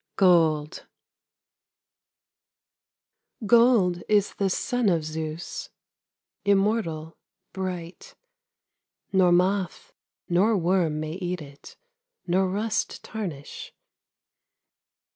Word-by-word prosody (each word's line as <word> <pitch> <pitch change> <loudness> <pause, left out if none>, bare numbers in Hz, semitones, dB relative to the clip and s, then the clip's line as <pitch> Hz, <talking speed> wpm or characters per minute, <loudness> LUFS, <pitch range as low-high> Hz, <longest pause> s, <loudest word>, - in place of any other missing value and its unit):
GOLD 165 -5 +2 2.6
Gold 215 -6 +4
is 205 -2 +2
the 195 -1 0
son 245 +3 0
of 165 -4 0
Zeus, 155 +1 -5 0.7
Immortal, 195 -6 0 0.3
bright; 180 -2 -6 1.0
Nor 185 -2 +4
moth 195 - 0 0.3
nor 200 +5 +3
worm 170 -3 +1
may 155 0 -4
eat 180 0 -3
it, 140 -1 -14 0.5
Nor 185 +1 +1
rust 215 +4 -2
tarnish. 175 -10 -7
180 Hz, 75 wpm, -25 LUFS, 165-200 Hz, 2.6 s, Gold